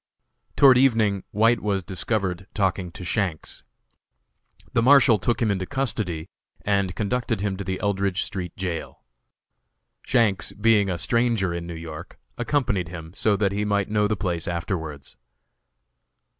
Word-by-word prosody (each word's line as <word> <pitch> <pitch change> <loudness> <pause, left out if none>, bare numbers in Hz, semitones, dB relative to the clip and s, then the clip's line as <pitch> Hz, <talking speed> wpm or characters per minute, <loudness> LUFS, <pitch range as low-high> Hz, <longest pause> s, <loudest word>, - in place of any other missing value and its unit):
Toward 130 -3 +7
evening 110 -7 +2
White 115 +2 +3
was 100 -2 -1
discovered 95 -1 -2
talking 95 -3 0
to 100 -2 -8
Shanks. 90 -4 -2 1.1
The - - +3
Marshal 130 -3 +6
took 120 +5 0
him 110 - +2
into 95 -2 -2
custody 110 - -2 0.4
and 100 -2 +1
conducted 115 -1 -1
him 100 -2 -1
to 100 - -4
the 95 -1 -3
Eldridge 100 -2 0
street 90 -3 -5
jail. 90 -3 -5 1.0
Shanks, 115 -6 +1
being 105 -2 +3
a 90 - -1
stranger 115 0 +1
in 85 0 -5
New 85 - -6
York, 80 -2 -9 0.2
accompanied 120 - 0
him, 80 -1 -9
so 105 +1 +1
that 100 -1 +1
he 105 +1 -1
might 100 -1 0
know 105 -1 +2
the 105 0 -1
place 85 -4 -2
afterwards. 80 - -4
100 Hz, 145 wpm, -24 LUFS, 90-110 Hz, 1.1 s, Toward